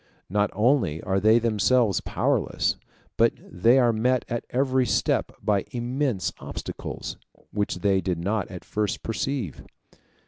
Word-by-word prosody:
Not 105 +1 +2
only 105 - +2
are 95 +1 +1
they 110 +3 +5
themselves 110 -1 +2
powerless, - - 0 0.4
but - - +4
they 115 +8 +2
are 120 -3 +4
met 125 +3 +1
at 120 - -3
every 130 0 +2
step - - +1
by 100 -2 +2
immense 125 -3 -1
obstacles, - - -6 0.3
which 105 -1 -1
they 95 -1 +3
did 90 -3 -1
not 100 +5 -1
at 90 -2 -9
first 105 -2 -2
perceive. 115 - -3
110 Hz, 135 wpm, -25 LUFS, 100-125 Hz, 0.4 s, they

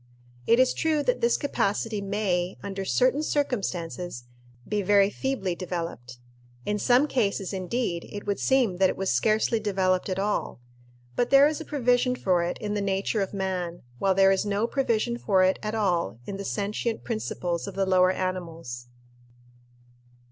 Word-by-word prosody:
It 230 - +5
is 255 0 +4
true 310 -2 +1
that - - 0
this 470 - +3
capacity 215 -6 -1
may, 195 -3 -1
under 195 -1 -4
certain 255 +8 +2
circumstances, 180 - -2 0.4
be 210 -1 0
very 200 +1 +4
feebly 255 -10 -2
developed. 165 - -5 0.5
In 210 0 -1
some 250 +6 +4
cases, 200 -7 -1
indeed, 185 -2 -2
it 205 - -7
would 200 - -1
seem 250 -9 +2
that 190 0 +4
it - - -3
was 190 0 0
scarcely 215 - +2
developed 190 -3 0
at 185 - -2
all; 205 - -1 0.6
but 240 - +1
there 275 +1 +7
is 310 +1 -3
a - - -7
provision 250 -3 +1
for 185 -7 +1
it 170 +1 -2
in 210 -1 -4
the 205 - -1
nature 195 +2 0
of 195 - -2
man, 185 -3 -3 0.2
while 190 -1 +2
there 195 0 +5
is 195 - +2
no 205 +1 0
provision 235 -2 0
for 190 -5 +3
it 185 +1 +2
at 215 +1 -3
all 175 - 0
in 195 - -5
the 200 - -6
sentient 210 +3 -2
principles 180 -6 -3
of 200 - -7
the 195 0 +1
lower 185 -1 +4
animals. 165 -10 -4
200 Hz, 170 wpm, -26 LUFS, 185-230 Hz, 0.6 s, there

